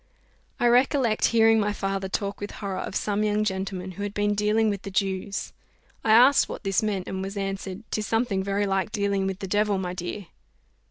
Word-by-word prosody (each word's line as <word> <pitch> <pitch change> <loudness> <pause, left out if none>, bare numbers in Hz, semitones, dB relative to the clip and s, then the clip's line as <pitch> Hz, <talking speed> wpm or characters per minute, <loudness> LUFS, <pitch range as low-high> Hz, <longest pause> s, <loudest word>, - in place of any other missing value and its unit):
I - - +1
recollect 245 -1 +3
hearing 225 -1 +5
my 205 0 0
father 195 -1 -2
talk 200 +1 -3
with 205 - -4
horror 195 -3 -4
of - - -5
some 210 0 0
young 210 0 +1
gentleman 190 -2 -3
who 185 - -9
had 205 0 -4
been 205 0 +1
dealing 210 +2 +2
with 200 -2 -1
the 200 - -7
Jews, 195 0 -2 0.5
I - - -1
asked 250 +5 +6
what - - -7
this 195 -1 +1
meant, 205 -4 -2
and 190 - -4
was 195 +2 -5
answered, 195 0 -4
"'Tis 215 -1 -2
something 225 -4 0
very 200 +1 0
like 195 +1 0
dealing 200 -2 0
with 190 -1 -3
the 195 - -4
devil, 205 +1 +1
my 180 -1 -3
dear." 180 +3 -5
200 Hz, 205 wpm, -25 LUFS, 195-215 Hz, 0.5 s, asked